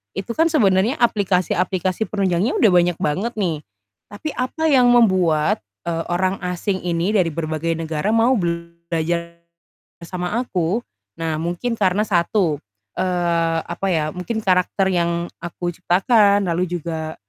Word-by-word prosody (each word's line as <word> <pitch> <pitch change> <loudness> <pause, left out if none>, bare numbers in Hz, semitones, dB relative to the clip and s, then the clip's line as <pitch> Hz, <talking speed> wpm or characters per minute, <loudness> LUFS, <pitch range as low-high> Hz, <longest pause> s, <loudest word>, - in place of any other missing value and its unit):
itu 195 +4 -4
kan 325 +1 +3
sebenarnya 210 - +2
aplikasi-aplikasi 185 -3 +1
penunjangnya 195 0 0
udah 225 - +6
banyak 175 -1 +3
banget 190 +11 -1
nih, 160 -6 -1 0.5
tapi 215 +10 -5
apa 255 +6 -1
yang 255 -4 +5
membuat, 185 -10 +3 0.3
eee, 165 -1 -1
orang 185 +2 +1
asing 180 +2 -2
ini 175 +4 0
dari 175 -4 +2
berbagai 160 +1 -2
negara 160 +5 -1
mau 230 +3 +4
belajar 170 -2 -3 0.6
bersama 180 +3 -4
aku? 195 -2 -1 0.4
Nah, 165 -1 -1
mungkin 175 +9 -2
karena 195 +1 +2
satu, 170 -4 +1 0.4
eee, 170 -2 +1
apa 175 +3 -4
ya, 155 -3 0
mungkin 200 +5 -4
karakter 190 +1 +2
yang 170 -1 0
aku 175 +1 -4
ciptakan, 200 +3 +3
lalu 175 +2 0
juga, 160 -1 -5
180 Hz, 130 wpm, -21 LUFS, 170-200 Hz, 0.6 s, udah